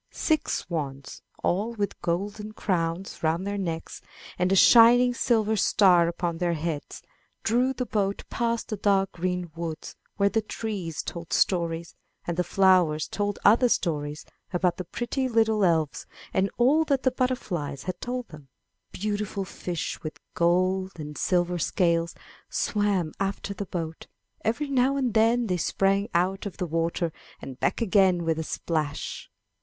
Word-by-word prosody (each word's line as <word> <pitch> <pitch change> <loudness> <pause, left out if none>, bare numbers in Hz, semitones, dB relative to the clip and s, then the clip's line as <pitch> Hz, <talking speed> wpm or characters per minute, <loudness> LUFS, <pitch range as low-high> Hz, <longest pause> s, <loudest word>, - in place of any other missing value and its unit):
Six 310 -3 0
swans, 140 -5 -5 0.2
all 210 +6 0
with 205 -2 -3
golden 205 +5 -3
crowns 175 -2 -2
round 165 +3 0
their 200 0 -2
necks, 165 -4 -4 0.4
and 180 +1 +2
a - - +4
shining 240 +4 +7
silver 220 -3 +1
star 180 -4 +4
upon 170 -1 -2
their 175 -1 +1
heads, 155 -1 -4 0.4
drew 245 +4 +2
the 255 -1 -3
boat 200 -3 -1
past 235 -1 -1
the 215 - -3
dark 195 -1 +2
green 180 -1 -3
woods 165 -2 -5 0.2
where 200 -1 +4
the 225 +2 +1
trees 205 -7 -4
told 170 -1 -7
stories; 170 -2 +1 0.3
and 170 - -2
the 180 - +1
flowers 180 -4 +3
told 205 -1 -2
other 235 +4 +6
stories 150 -7 -1 0.3
about 180 -1 +1
the 185 - -5
pretty 255 +7 -2
little 220 -2 +2
elves, 160 -5 +1 0.3
and 190 +1 +2
all 280 +7 +4
that 275 -3 +1
the 260 - +3
butterflies 210 - -2
had 185 - -5
told 250 0 -4
them. 150 -3 -13 0.4
Beautiful 205 0 -3
fish 175 -2 -5
with 155 - -7
gold 185 +2 +1
and 150 -2 -7
silver 175 0 +1
scales 170 -1 +1 0.3
swam 200 -6 0
after 195 +1 -2
the 200 0 -6
boat; 165 -2 -5 0.4
every 235 +7 0
now 265 +1 +2
and 255 -5 0
then 230 +2 +3
they 180 -4 0
sprang 195 +4 +1
out 190 +3 +1
of 195 - -9
the 180 - -2
water 165 0 -1 0.3
and 130 -2 -9
back - - 0
again 190 -4 +3
with 160 -1 0
a - - -1
splash. 155 -2 -3
190 Hz, 155 wpm, -26 LUFS, 170-215 Hz, 0.4 s, shining